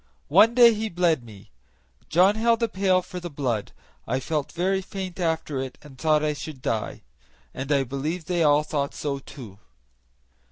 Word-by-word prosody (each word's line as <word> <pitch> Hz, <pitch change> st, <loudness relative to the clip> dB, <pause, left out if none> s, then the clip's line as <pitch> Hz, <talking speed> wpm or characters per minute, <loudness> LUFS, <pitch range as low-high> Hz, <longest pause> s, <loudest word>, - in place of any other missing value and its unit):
One 225 Hz, +6 st, +6 dB
day 240 Hz, -2 st, +8 dB
he 220 Hz, +1 st, -3 dB
bled 170 Hz, -, +1 dB
me; 105 Hz, -4 st, -14 dB, 0.6 s
John 185 Hz, +5 st, +5 dB
held 230 Hz, +1 st, +2 dB
a -, -, +3 dB
pail 190 Hz, -3 st, +1 dB
for 180 Hz, 0 st, -7 dB
the 175 Hz, 0 st, -6 dB
blood. 125 Hz, -8 st, -2 dB, 0.4 s
I 130 Hz, +3 st, 0 dB
felt 150 Hz, +1 st, -2 dB
very 190 Hz, +2 st, 0 dB
faint 190 Hz, -1 st, -7 dB
after 160 Hz, -5 st, -1 dB
it 130 Hz, -1 st, -6 dB
and 145 Hz, -3 st, -13 dB
thought 155 Hz, +2 st, +2 dB
I 150 Hz, 0 st, +1 dB
should 150 Hz, -1 st, -8 dB
die, 110 Hz, -3 st, -3 dB, 0.5 s
and 135 Hz, +2 st, -5 dB
I 140 Hz, -2 st, +3 dB
believe 150 Hz, +6 st, -4 dB
they 175 Hz, 0 st, 0 dB
all 150 Hz, -1 st, +4 dB
thought 145 Hz, -2 st, -2 dB
so 140 Hz, -2 st, -3 dB
too. 115 Hz, -8 st, -12 dB
155 Hz, 175 wpm, -25 LUFS, 140-185 Hz, 0.6 s, day